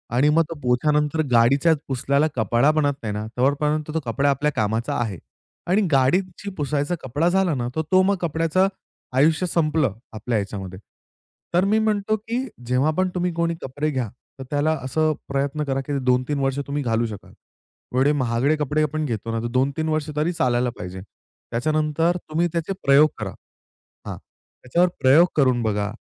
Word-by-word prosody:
आणि 140 Hz, +4 st, +4 dB
मग 165 Hz, +2 st, +4 dB
तो 165 Hz, -, -5 dB
पोछानंतर 150 Hz, +5 st, +1 dB
गाडीच्या 135 Hz, +8 st, +4 dB
पुसल्याला 140 Hz, +3 st, +1 dB
कपडा 120 Hz, +6 st, +3 dB
बनत 150 Hz, -2 st, +1 dB
नाही 105 Hz, -2 st, -2 dB
ना, 105 Hz, +1 st, -4 dB
तोपर्यंत 150 Hz, +3 st, +1 dB
कपडा 135 Hz, +5 st, +1 dB
आपल्या 145 Hz, +2 st, +1 dB
कामाचा 110 Hz, +6 st, -1 dB
आहे 110 Hz, -6 st, -2 dB, 0.5 s
आणि 205 Hz, -, +4 dB
गाडीची 180 Hz, +9 st, +1 dB
पुसायचा 145 Hz, +2 st, -1 dB
कपडा 145 Hz, +7 st, 0 dB
झाला 190 Hz, -2 st, +2 dB
ना, 120 Hz, -2 st, -2 dB
तर 160 Hz, -, +1 dB
तो 185 Hz, 0 st, +6 dB
मग 200 Hz, +1 st, +2 dB
कपड्याचं 165 Hz, +3 st, +1 dB, 0.5 s
आयुष्य 160 Hz, +6 st, +3 dB
संपलं 155 Hz, -, +1 dB, 0.2 s
आपल्या 110 Hz, +1 st, -2 dB
ह्याच्यामध्ये. 95 Hz, -2 st, -5 dB, 0.7 s
तर 180 Hz, +2 st, +3 dB
मी 215 Hz, +2 st, +3 dB
म्हणतो 215 Hz, -1 st, +1 dB
की 235 Hz, +5 st, -3 dB, 0.2 s
जेव्हा 130 Hz, +5 st, +2 dB
पण 185 Hz, 0 st, +2 dB
तुम्ही 180 Hz, 0 st, 0 dB
कोणी 170 Hz, 0 st, 0 dB
कपडे 145 Hz, +4 st, -3 dB
घ्या 130 Hz, -6 st, -2 dB, 0.3 s
तर -, -, -5 dB
त्याला 145 Hz, +2 st, +1 dB
असं 155 Hz, +4 st, +1 dB
प्रयत्न 140 Hz, +2 st, -1 dB
करा, 135 Hz, -2 st, -1 dB
की 140 Hz, +1 st, -3 dB
2-3 125 Hz, +3 st, +1 dB
वर्ष 135 Hz, 0 st, 0 dB
तुम्ही 145 Hz, 0 st, -2 dB
घालू 115 Hz, -1 st, +1 dB
शकाल. 105 Hz, -2 st, -10 dB, 0.6 s
एवढे 135 Hz, +3 st, +4 dB
महागडे 130 Hz, +1 st, +1 dB
कपडे 150 Hz, +1 st, 0 dB
आपण 155 Hz, +1 st, -1 dB
घेतो 115 Hz, -3 st, -3 dB
ना, 115 Hz, -, -1 dB
तर 120 Hz, -, -2 dB
2-3 135 Hz, +6 st, 0 dB
वर्ष 155 Hz, -1 st, -1 dB
तरी 155 Hz, +4 st, 0 dB
चालायला 125 Hz, -5 st, +1 dB
पाहिजे. 90 Hz, +1 st, -7 dB, 0.5 s
त्याच्यानंतर 155 Hz, +6 st, +1 dB
तुम्ही 165 Hz, +3 st, +1 dB
त्याचे 170 Hz, +3 st, -2 dB
प्रयोग 140 Hz, +3 st, +6 dB
करा 100 Hz, -3 st, -4 dB, 0.8 s
हां, -, -, -5 dB
त्याच्यावर 175 Hz, +8 st, -2 dB
प्रयोग 145 Hz, +7 st, +6 dB
करून 130 Hz, -5 st, +3 dB
बघा. 105 Hz, -1 st, -1 dB
145 Hz, 165 wpm, -23 LUFS, 125-160 Hz, 0.8 s, तो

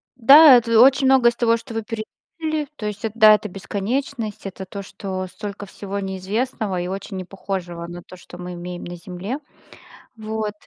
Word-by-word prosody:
да, 275 Hz, +2 st, +9 dB
это 230 Hz, -1 st, +2 dB
очень 265 Hz, +2 st, +6 dB
многое 255 Hz, -3 st, +5 dB
из -, -, -14 dB
того, 230 Hz, -1 st, +2 dB
что 230 Hz, 0 st, -11 dB
вы 225 Hz, -1 st, -3 dB
перечислили. 300 Hz, +7 st, -5 dB
То 210 Hz, -, -7 dB
есть, 210 Hz, +2 st, -5 dB
это 220 Hz, +1 st, -5 dB
да, 215 Hz, 0 st, +9 dB
это 210 Hz, 0 st, -5 dB
бесконечность, 215 Hz, +4 st, -4 dB
это 190 Hz, 0 st, -8 dB
то, 200 Hz, +2 st, -7 dB
что 185 Hz, -1 st, -6 dB
столько 205 Hz, +1 st, -7 dB
всего 200 Hz, +1 st, -6 dB
неизвестного, 195 Hz, +1 st, -2 dB
и 180 Hz, -, -3 dB
очень 195 Hz, +1 st, -6 dB
непохожего 185 Hz, -2 st, -5 dB
на 175 Hz, 0 st, -8 dB
то, 185 Hz, -, -13 dB
что 175 Hz, -, -13 dB
мы 180 Hz, 0 st, -7 dB
имеем 175 Hz, 0 st, -7 dB
на 175 Hz, 0 st, -7 dB
Земле. 185 Hz, +8 st, -6 dB, 0.8 s
Вот. 215 Hz, -1 st, -4 dB
210 Hz, 180 wpm, -22 LUFS, 185-230 Hz, 0.8 s, да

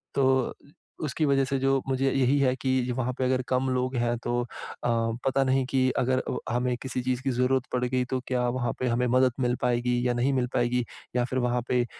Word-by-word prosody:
तो 130 Hz, -2 st, +2 dB, 0.5 s
उसकी 155 Hz, +1 st, 0 dB
वज़ह 140 Hz, -1 st, +3 dB
से 135 Hz, +1 st, -1 dB
जो 135 Hz, 0 st, +2 dB
मुझे 135 Hz, 0 st, +1 dB
यही 135 Hz, +1 st, +2 dB
है 130 Hz, -2 st, +3 dB
कि 130 Hz, -1 st, 0 dB
वहाँ 130 Hz, 0 st, -1 dB
पे -, -, -1 dB
अगर 130 Hz, 0 st, +1 dB
कम 130 Hz, +1 st, +1 dB
लोग 130 Hz, 0 st, -1 dB
हैं 120 Hz, 0 st, +1 dB
तो 120 Hz, 0 st, 0 dB
अ, -, -, -3 dB, 0.8 s
पता 135 Hz, 0 st, +2 dB
नहीं 130 Hz, 0 st, +2 dB
कि 130 Hz, -1 st, +2 dB
अगर 130 Hz, +1 st, +2 dB
अ, -, -, -4 dB, 0.2 s
हमें 125 Hz, 0 st, +1 dB
किसी 130 Hz, -1 st, -3 dB
चीज़ 130 Hz, 0 st, -1 dB
की 135 Hz, -, 0 dB
ज़रूरत 125 Hz, +1 st, +1 dB
पड़ 125 Hz, -1 st, 0 dB
गई 125 Hz, 0 st, 0 dB
तो 130 Hz, -, +1 dB
क्या 125 Hz, -1 st, 0 dB
वहाँ 120 Hz, -1 st, -1 dB
पे 130 Hz, -, 0 dB
हमें 120 Hz, +1 st, +1 dB
मदद 130 Hz, +1 st, +4 dB
मिल 125 Hz, -1 st, +1 dB
पाएगी 125 Hz, 0 st, +1 dB
या 120 Hz, -, +1 dB
नहीं 120 Hz, +3 st, +1 dB
मिल 125 Hz, -2 st, +1 dB
पाएगी। 120 Hz, +1 st, +1 dB, 0.3 s
या 125 Hz, -, +3 dB
फिर 130 Hz, +1 st, -2 dB
वहाँ 125 Hz, 0 st, +1 dB
पे, 125 Hz, -1 st, +2 dB
130 Hz, 225 wpm, -27 LUFS, 125-130 Hz, 0.8 s, मदद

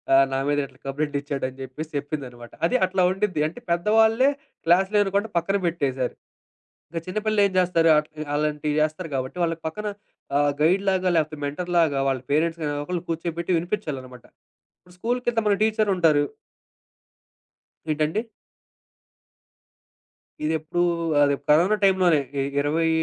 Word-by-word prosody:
ఆహ్, 135 Hz, 0 st, +6 dB
నా 135 Hz, -, +1 dB
మీద 145 Hz, 0 st, +2 dB
ఇట్లా -, -, -24 dB
కం‌ప్లైట్ 145 Hz, +1 st, -2 dB
ఇచ్చాడు" 140 Hz, -2 st, -3 dB
అని 130 Hz, -, -16 dB
జెప్పేసి 150 Hz, +5 st, -7 dB
చెప్పిందనమాట. 130 Hz, -5 st, -7 dB, 0.2 s
అది 255 Hz, -, +2 dB
అట్లా 185 Hz, 0 st, 0 dB
ఉండిద్ది. 185 Hz, -6 st, 0 dB
అంటే 245 Hz, -, -12 dB
పెద్దవాళ్ళే 220 Hz, +8 st, +4 dB, 0.4 s
క్లాసులు 190 Hz, +4 st, +4 dB
వినకుండా 200 Hz, +2 st, -1 dB
పక్కన 195 Hz, +4 st, 0 dB
పెట్టేసారు. 135 Hz, -6 st, -1 dB, 0.8 s
ఇంకా 165 Hz, -1 st, -3 dB
చిన్న 185 Hz, +4 st, -2 dB
పిల్లలు 215 Hz, -1 st, +2 dB
ఏం -, -, -8 dB
జేస్తారు 175 Hz, -2 st, +3 dB
అట్లా 155 Hz, 0 st, -3 dB
అలాంటివి 150 Hz, 0 st, -1 dB
చేస్తారు 155 Hz, +2 st, -1 dB
కాబట్టి 130 Hz, +6 st, -3 dB
వాళ్ళకి 165 Hz, -1 st, -1 dB
పక్కన 210 Hz, +6 st, -4 dB, 0.5 s
ఆహ్, 145 Hz, 0 st, +3 dB
గైడ్‌లాగా 185 Hz, +2 st, +2 dB
లేకపోతే 155 Hz, -1 st, 0 dB
మెంటర్‌లాగా 165 Hz, -1 st, +1 dB
వాళ్ళ 130 Hz, -1 st, -1 dB
పేరెంట్స్‌‌ని 160 Hz, +1 st, +1 dB
ఎవరోకళ్ళు 155 Hz, +4 st, -3 dB
కూర్చోయబెట్టి 170 Hz, +1 st, -3 dB
వినిపించాళ్ళనమాట. 140 Hz, -, -5 dB, 0.5 s
ఇప్పుడు 180 Hz, 0 st, -20 dB
స్కూలు‌కెల్తే 240 Hz, 0 st, 0 dB
మన 200 Hz, -, +4 dB
టీచర్లుంటారు. 190 Hz, -9 st, +3 dB, 1.7 s
ఏంటండి? 155 Hz, +7 st, 0 dB, 2.2 s
ఇదెప్పుడు, 160 Hz, +2 st, -1 dB, 0.4 s
అది 140 Hz, 0 st, +3 dB
కరోనా 175 Hz, +8 st, +5 dB
టైమ్ంలోనే. 185 Hz, -5 st, +4 dB, 0.2 s
ఇ 135 Hz, -, +1 dB, 0.2 s
20, 160 Hz, +3 st, +1 dB
165 Hz, 130 wpm, -24 LUFS, 145-190 Hz, 2.2 s, ఆహ్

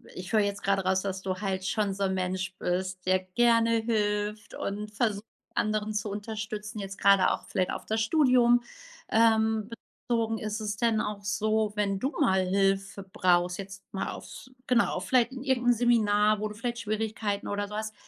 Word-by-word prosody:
ich 180 Hz, +1 st, -7 dB
höre 220 Hz, -, +4 dB
jetzt 200 Hz, -1 st, -1 dB
gerade 195 Hz, 0 st, +1 dB
raus, 190 Hz, 0 st, +2 dB
dass 190 Hz, -1 st, -4 dB
du 185 Hz, -1 st, -2 dB
halt 190 Hz, -1 st, -3 dB
schon 210 Hz, -2 st, 0 dB
so 200 Hz, +1 st, -3 dB
'n 190 Hz, -, 0 dB
Mensch 185 Hz, 0 st, -2 dB
bist, 185 Hz, +1 st, -2 dB
der 185 Hz, 0 st, +3 dB
gerne 230 Hz, +4 st, +3 dB
hilft 210 Hz, -1 st, -1 dB
und 210 Hz, +1 st, -4 dB
versucht, 215 Hz, -3 st, 0 dB, 0.3 s
anderen 215 Hz, 0 st, 0 dB
zu 210 Hz, 0 st, -2 dB
unterstützen, 210 Hz, 0 st, -5 dB
jetzt 195 Hz, -1 st, -6 dB
gerade 200 Hz, -1 st, +5 dB
auch -, -, -3 dB
vielleicht 185 Hz, -1 st, 0 dB
auf -, -, -5 dB
das 220 Hz, +1 st, -1 dB
Studium, 245 Hz, -2 st, +4 dB, 0.5 s
ähm, 220 Hz, -1 st, +3 dB, 0.4 s
bezogen. 225 Hz, -2 st, 0 dB
Ist 215 Hz, +1 st, -4 dB
es 210 Hz, -1 st, -3 dB
denn 225 Hz, -1 st, +2 dB
auch 205 Hz, -1 st, -4 dB
so, 215 Hz, +1 st, 0 dB
wenn 200 Hz, -2 st, 0 dB
du 270 Hz, +6 st, -1 dB
mal 190 Hz, -7 st, +3 dB
Hilfe 195 Hz, +1 st, 0 dB
brauchst 180 Hz, -1 st, +1 dB
jetzt 195 Hz, 0 st, -8 dB
mal 195 Hz, -, -3 dB
aufs -, -, -10 dB, 0.2 s
genau, 245 Hz, -2 st, +2 dB
vielleicht 250 Hz, -1 st, +2 dB
in 260 Hz, 0 st, -7 dB
irgendein 245 Hz, -3 st, +3 dB
Seminar, 215 Hz, -3 st, +3 dB
wo 215 Hz, -, -1 dB
du 210 Hz, -, -9 dB
vielleicht 235 Hz, +2 st, -3 dB
Schwierigkeiten 215 Hz, -1 st, -2 dB
oder 205 Hz, 0 st, -2 dB
so 210 Hz, -, -8 dB
hast, 215 Hz, 0 st, -4 dB
210 Hz, 185 wpm, -28 LUFS, 195-220 Hz, 0.5 s, gerade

